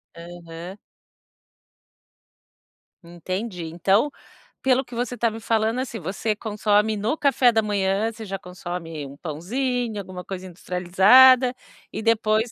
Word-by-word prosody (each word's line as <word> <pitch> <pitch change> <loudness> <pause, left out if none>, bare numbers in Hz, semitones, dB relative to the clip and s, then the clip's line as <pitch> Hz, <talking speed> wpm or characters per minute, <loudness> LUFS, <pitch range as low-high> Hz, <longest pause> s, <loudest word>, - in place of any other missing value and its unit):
Aham. 170 +1 -10 2.3
Entendi. 180 +2 -5
Então, 195 - +1 0.5
pelo 265 0 +2
que 245 -2 -11
você 245 +1 -3
tá 230 +1 +2
me 225 +1 -7
falando, 225 +2 0
assim, 240 -4 -4
você 205 +5 -2
consome, 210 0 +1
no 220 +9 -1
café 265 -3 +4
da 225 - +2
manhã, 205 +1 0
você 225 0 -9
já 195 -1 -5
consome 175 -4 -7
um 140 +1 -10
pãozinho, 225 - -3
alguma 185 -2 -8
coisa 190 -1 -6
industrializada 195 +9 +5 0.4
e - - -4
depois 220 0 +1
210 Hz, 125 wpm, -23 LUFS, 180-230 Hz, 2.3 s, industrializada